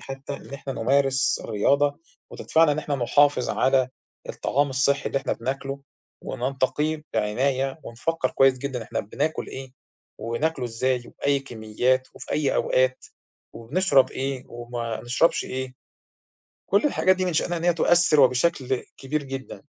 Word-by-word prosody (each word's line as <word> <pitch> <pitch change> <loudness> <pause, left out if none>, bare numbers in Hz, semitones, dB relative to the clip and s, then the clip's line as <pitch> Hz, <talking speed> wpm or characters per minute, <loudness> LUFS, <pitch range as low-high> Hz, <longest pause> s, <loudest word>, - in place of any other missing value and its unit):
حتى 135 +1 -7
إن 140 - -10
إحنا 135 0 -6
نمارس 135 +3 +2
الرياضة، 140 +8 +1 0.3
وتدفعنا 160 -2 +2
إن 150 - -3
إحنا 145 -1 -2
نحافظ 140 +1 +3
على 130 -1 +2 0.4
الطعام 140 +1 0
الصحي 140 +1 +1
اللي 135 - 0
إحنا - - -2
بناكله، 135 +3 -4 0.4
وننتقيه 135 +4 -1
بعناية، 130 +6 0
ونفكّر 130 +4 -2
كويس 135 -1 +4
جدًا 130 -3 -4
إحنا - - -3
بناكل 145 +9 -2
إيه، 130 -1 -8 0.5
وناكله 125 +5 -1
إزاي 125 +2 0
وبأي 140 0 0
كميات 125 +1 -1
وفي - - -7
أي 145 -2 +1
أوقات، 130 0 +1 0.5
وبنشرب 140 +4 +2
إيه 135 -1 -3
وما 120 -1 -5
نشربش 125 +8 +2
إيه. 130 0 -5 1.0
كل 200 +8 +3
الحاجات 185 -9 +3
دي 185 - -1
من 180 - -1
شأنها 175 +2 0
إن 170 - -5
هي 175 -1 +3
تؤثّر 170 -2 +4
وبشكل 130 0 +2
كبير 145 +2 -2
جدًا. 135 0 -7
135 Hz, 140 wpm, -24 LUFS, 125-145 Hz, 1.0 s, كويس